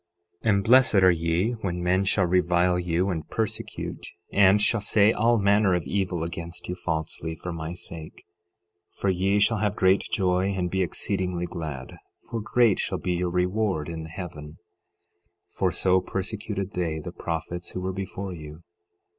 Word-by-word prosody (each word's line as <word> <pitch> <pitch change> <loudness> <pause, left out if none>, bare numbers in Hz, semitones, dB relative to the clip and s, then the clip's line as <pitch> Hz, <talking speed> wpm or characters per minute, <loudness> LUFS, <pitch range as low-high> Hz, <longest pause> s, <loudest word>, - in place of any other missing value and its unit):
12:11 115 - +2
And 100 -1 +3
blessed 120 +1 +5
are 95 -2 +6
ye 85 +5 0
when 90 -2 -2
men 95 +2 +2
shall 95 0 +2
revile 90 0 +2
you 90 +2 0
and 80 -3 -5
persecute, 110 0 -4 0.3
and 100 0 +6
shall 110 +1 +3
say 105 +1 +4
all 115 +2 +3
manner 100 -2 +3
of 90 - -1
evil 90 -4 -1
against 85 +1 -6
you 90 - -2
falsely, 80 -2 -3
for 85 +2 -6
my 80 +1 -5
sake; 85 - -8 0.7
12:12 - - -24
For 100 - +2
ye 95 +3 +1
shall 110 +2 +3
have 105 -1 0
great 95 0 +4
joy 95 0 +1
and 90 -2 -2
be 95 - 0
exceedingly 90 0 -2
glad, 80 -7 -6 0.3
for 115 -1 -3
great 115 -1 +3
shall - - -1
be 90 - -2
your 90 0 -1
reward 90 -2 0
in 80 -1 -5
heaven; 80 -3 -8 1.0
for - - +1
so 95 0 +3
persecuted 100 0 -4
they 85 -3 -2
the 80 - -6
prophets 85 +1 -4
who 90 - -4
were 95 +1 -2
before 95 0 -5
you. 80 0 -10
90 Hz, 170 wpm, -26 LUFS, 85-100 Hz, 1.0 s, are